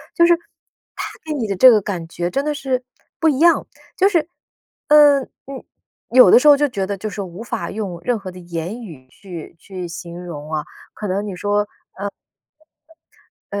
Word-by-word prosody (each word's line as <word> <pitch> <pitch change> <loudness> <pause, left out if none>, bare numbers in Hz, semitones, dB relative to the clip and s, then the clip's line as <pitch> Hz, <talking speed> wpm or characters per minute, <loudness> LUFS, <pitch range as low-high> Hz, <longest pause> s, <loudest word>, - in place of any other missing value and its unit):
就 340 - +5
是 345 - +6 0.6
它 - - -4 0.2
给 315 - -5
你 245 -7 -2
的 200 - -2
这 255 +7 +8
个 215 -2 +4
感 185 -4 -4
觉 175 0 -3
真 275 - 0
的 300 - 0
是 265 -2 -2 0.4
不 325 - +4
一 275 -3 0
样， 340 +1 +4 0.3
就 390 +1 +4
是， 335 -5 +1 0.6
嗯， 290 -2 +7 0.2
嗯， 275 -1 -8 0.5
有 255 +1 +8
的 - - +9
时 300 - +2
候 285 - +8
就 295 +1 +2
觉 195 -8 -3
得 200 -1 -3
就 215 +3 -4
是 - - -9
说 200 -2 -4
无 180 +3 -10
法 235 -2 -4
用 195 -5 -4
任 240 +1 0
何 195 -2 -7
的 180 - -11
言 175 +6 -5
语 150 - -12
去 175 -2 -10
去 185 -2 -7
形 170 +1 -8
容 155 -2 -7
啊。 155 -1 -2 0.3
可 210 - -5
能 200 +2 -1
你 200 - -5
说， 205 +3 0 1.9
呃， 200 0 -3
205 Hz, 210 characters per minute, -20 LUFS, 180-275 Hz, 1.9 s, 的